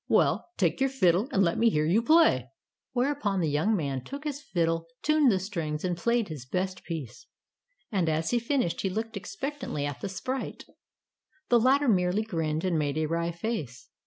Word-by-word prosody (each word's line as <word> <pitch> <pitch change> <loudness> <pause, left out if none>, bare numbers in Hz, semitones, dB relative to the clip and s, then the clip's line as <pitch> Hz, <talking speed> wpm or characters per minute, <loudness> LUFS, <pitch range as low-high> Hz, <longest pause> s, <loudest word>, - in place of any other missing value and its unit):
"Well, - - +2
take 180 +4 +1
your 270 - +3
fiddle 205 -3 +2
and 195 - +3
let 170 -2 +1
me 230 - +5
hear 155 -7 +1
you 185 +8 +3
play." 230 - +4 0.4
Whereupon 245 -6 0
the 160 -4 +1
young 160 +10 +2
man 140 -7 -2
took 280 - -7
his 295 -2 -4
fiddle, 165 - -1 0.2
tuned 305 -4 +4
the 195 - +2
strings, 170 -6 -3
and 180 -1 0
played 235 +5 +1
his 150 -6 -7
best 185 +7 -3
piece^ 150 -9 -6 0.7
and 185 -6 +1
as 160 +1 0
he 240 - +3
finished, 235 - 0
he 195 - 0
looked 220 +4 -4
expectantly 200 - -4
at 145 -2 -5
the 200 - -3
sprite. 255 +8 -4 0.8
The 240 - +6
latter 270 +4 +3
merely 185 -1 +2
grinned 160 -5 -2
and 170 -4 +1
made 145 0 -1
a 155 - +1
wry 170 +2 -1
face. 165 - -5
185 Hz, 190 wpm, -28 LUFS, 160-235 Hz, 0.8 s, The